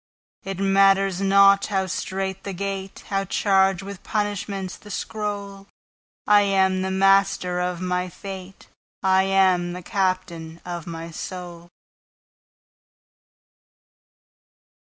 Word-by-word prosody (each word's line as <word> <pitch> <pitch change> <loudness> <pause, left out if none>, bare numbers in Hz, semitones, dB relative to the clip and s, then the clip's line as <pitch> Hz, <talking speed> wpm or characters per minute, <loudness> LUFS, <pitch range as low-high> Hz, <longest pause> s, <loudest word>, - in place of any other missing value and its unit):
It 195 -1 -5
matters 195 -1 +3
not 200 0 +5
how 195 -2 0
strait 190 +1 -4
the 200 - -5
gate, 195 0 -5
How 195 -1 0
charged 195 -1 +2
with 200 -1 -8
punishments 200 -3 -3
the 210 - -15
scroll,I 205 0 -2
am 190 -2 +2
the 190 - -1
master 190 -2 +3
of 180 0 -2
my 180 0 -1
fate:I 190 0 -3
am 185 -2 +2
the 180 0 -7
captain 185 -4 -2
of 175 -1 -6
my 165 0 -6
soul. 175 0 -8
190 Hz, 100 wpm, -23 LUFS, 180-195 Hz, -, not